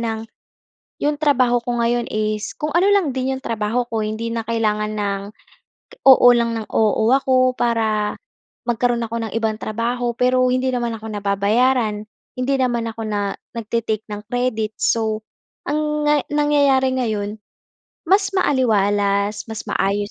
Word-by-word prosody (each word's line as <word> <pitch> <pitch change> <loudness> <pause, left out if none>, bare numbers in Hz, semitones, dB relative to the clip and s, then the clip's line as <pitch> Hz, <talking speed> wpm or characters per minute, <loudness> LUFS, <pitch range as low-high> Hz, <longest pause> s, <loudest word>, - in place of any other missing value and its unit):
ng 225 -1 -3 0.8
'yong 295 0 +1
trabaho 255 -5 +3
ko 240 0 -2
ngayon 240 0 0
is 215 0 -2
kung 300 0 -3
ano 355 +4 +3
lang 385 -8 +3
din 265 +1 -1
'yong 265 - -11
trabaho 230 +2 -1
ko 225 -2 -2
hindi 220 +2 -3
na 230 - -1
kailangan 215 -2 0
ng, 200 -1 -2 0.8
oo 260 -2 +8
lang 235 -1 0
ng 215 - -6
oo 220 +1 +2
ako 255 -1 +3
para 220 -3 0 0.5
magkaro'n 240 0 +1
ako 230 +1 -5
ng - - -13
ibang 220 -1 0
trabaho 235 +2 -1
pero 255 +1 +2
hindi 255 +1 +1
naman 240 -1 -1
ako 220 - -10
nababayaran, 210 +3 +1 0.4
hindi 255 +2 0
naman 240 -3 0
ako 225 0 -7
na 205 -1 -1 0.2
nagte-take 225 -1 -2
ng 210 0 -6
credit. 225 -3 -1
So 220 -1 0 0.5
ang 300 0 -1
nga 295 - +4
nangyayari 285 -3 +3
ngayon, 215 -3 -2 0.7
mas 390 +3 +3
maaliwalas, 205 - +1
mas 220 - -5
maayos 205 +2 0
230 Hz, 145 wpm, -20 LUFS, 215-255 Hz, 0.8 s, oo